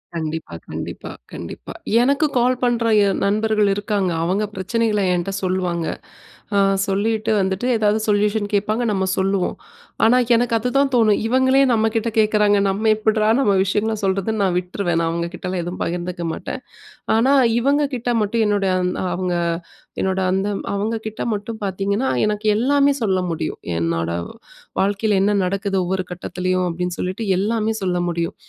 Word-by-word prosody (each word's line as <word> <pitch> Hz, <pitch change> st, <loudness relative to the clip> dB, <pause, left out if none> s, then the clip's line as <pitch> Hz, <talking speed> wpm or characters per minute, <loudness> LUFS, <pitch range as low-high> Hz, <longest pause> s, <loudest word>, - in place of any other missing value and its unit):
கண்டிப்பா, 160 Hz, -, -4 dB
கண்டிப்பா, -, -, -6 dB, 0.2 s
கண்டிப்பா. -, -, -8 dB, 0.3 s
எனக்கு 280 Hz, +5 st, +2 dB
கால் 250 Hz, +1 st, +3 dB
பண்ற 240 Hz, -1 st, +1 dB, 0.2 s
என் 195 Hz, -, 0 dB
நண்பர்கள் 215 Hz, 0 st, +2 dB
இருக்காங்க. 205 Hz, -2 st, -1 dB
அவுங்க 190 Hz, +5 st, 0 dB
பிரச்சனைகள 210 Hz, +2 st, 0 dB
என்ட்ட 180 Hz, +2 st, -1 dB
சொல்லுவாங்க. 180 Hz, -2 st, -1 dB, 0.7 s
அ -, -, +3 dB, 0.3 s
சொல்லிட்டு 215 Hz, +3 st, 0 dB
வந்துட்டு 190 Hz, +4 st, -1 dB
எதாவது 215 Hz, 0 st, +2 dB
சொல்யூஷன் 205 Hz, 0 st, +1 dB
கேட்பாங்க, 210 Hz, +3 st, +1 dB
நம்ப 190 Hz, -1 st, 0 dB
சொல்லுவோம். 190 Hz, -1 st, 0 dB, 0.5 s
ஆனா, 230 Hz, +3 st, +5 dB, 0.2 s
எனக்கு 235 Hz, 0 st, +1 dB
அதுதான் 270 Hz, +4 st, +1 dB
தோணும். 220 Hz, -4 st, +4 dB
இவங்களே 260 Hz, +2 st, +4 dB
நம்ப 220 Hz, -1 st, +2 dB
கிட்ட 225 Hz, 0 st, 0 dB
கேட்குறாங்க. 210 Hz, -1 st, +3 dB
நம்ப 195 Hz, +3 st, -2 dB
எப்பிட்றா 215 Hz, 0 st, +1 dB
நம்ப 205 Hz, -7 st, +3 dB
விஷயங்கள 215 Hz, +3 st, 0 dB
சொல்றதுன்னு 195 Hz, +3 st, 0 dB
நான் 185 Hz, -2 st, +1 dB
விட்ருவேன். 180 Hz, -1 st, -2 dB
நான் 165 Hz, -, +1 dB
அவுங்க 170 Hz, 0 st, -2 dB
கிட்டலாம் 180 Hz, -1 st, -3 dB
எதுவும் 175 Hz, +2 st, -6 dB
பகிர்ந்துக்க 175 Hz, 0 st, -3 dB
மாட்டேன். -, -, -6 dB, 0.6 s
ஆனா, 260 Hz, +5 st, +3 dB, 0.3 s
இவங்ககிட்ட 275 Hz, -2 st, 0 dB
மட்டும் 220 Hz, +2 st, +1 dB
என்னோட, 205 Hz, -1 st, +1 dB
அந் 180 Hz, 0 st, 0 dB, 0.2 s
அவுங்க 180 Hz, 0 st, -1 dB, 0.7 s
என்னோட 190 Hz, 0 st, 0 dB
அந்த 195 Hz, +2 st, 0 dB, 0.3 s
அவுங்ககிட்ட 220 Hz, +1 st, -3 dB
மட்டும் 215 Hz, +2 st, -6 dB
பாத்தீங்கன்னா, 200 Hz, +6 st, -1 dB, 0.2 s
எனக்கு 210 Hz, 0 st, -2 dB
எல்லாமே 280 Hz, +4 st, +3 dB
சொல்ல 190 Hz, -3 st, +1 dB
முடியும். 160 Hz, -2 st, -3 dB, 0.2 s
என்னோட 85 Hz, 0 st, -1 dB, 0.7 s
வாழ்க்கையில 200 Hz, +1 st, +1 dB
என்ன 200 Hz, +2 st, +3 dB
நடக்குது 195 Hz, +1 st, -1 dB
ஒவ்வொரு 185 Hz, +1 st, -1 dB
கட்டத்துலேயும், 180 Hz, +1 st, -2 dB
அப்பிடின்னு 180 Hz, +1 st, -3 dB
சொல்லிட்டு 185 Hz, +5 st, -3 dB, 0.2 s
எல்லாமே 220 Hz, +2 st, 0 dB
சொல்ல 180 Hz, -1 st, 0 dB
முடியும். 170 Hz, -1 st, -2 dB
205 Hz, 145 wpm, -21 LUFS, 185-225 Hz, 0.7 s, ஆனா